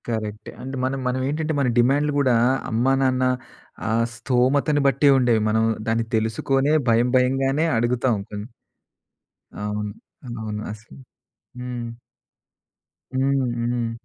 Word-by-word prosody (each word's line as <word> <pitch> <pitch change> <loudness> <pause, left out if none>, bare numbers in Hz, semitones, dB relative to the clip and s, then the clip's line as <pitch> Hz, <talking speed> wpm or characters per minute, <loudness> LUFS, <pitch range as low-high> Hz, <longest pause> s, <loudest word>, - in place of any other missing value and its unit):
కరెక్టే. 110 -2 -4
అండ్ 135 +1 -6
మన 130 +1 0
మనవేంటంటే 140 +5 -1
మన 135 - +2
డిమాండ్లు 145 +4 +3
గూడా 130 -4 +3 0.4
అమ్మా, 120 +4 +2
నాన్న 130 -1 +2 0.6
ఆ - - 0 0.3
స్థోమతను 135 +5 +2
బట్టే 140 +2 +4
ఉండేవి. 120 -4 +3
మనం 110 +1 +2 0.2
దాన్ని 115 0 +1
తెలుసుకొనే 135 +6 +1 0.2
భయం 115 +2 +3
భయంగానే 135 +4 +2
అడుగుతాం 120 0 +1
కొన్ని. 105 0 -6 1.2
అవును. 105 0 -3 0.5
అవును. 105 -1 -4
అసలు. 110 +5 -14 0.6
హ్మ్. 125 -1 -5 1.3
హ్మ్. 135 0 +2
హ్మ్. 120 -1 -1
125 Hz, 110 wpm, -23 LUFS, 115-135 Hz, 1.3 s, బట్టే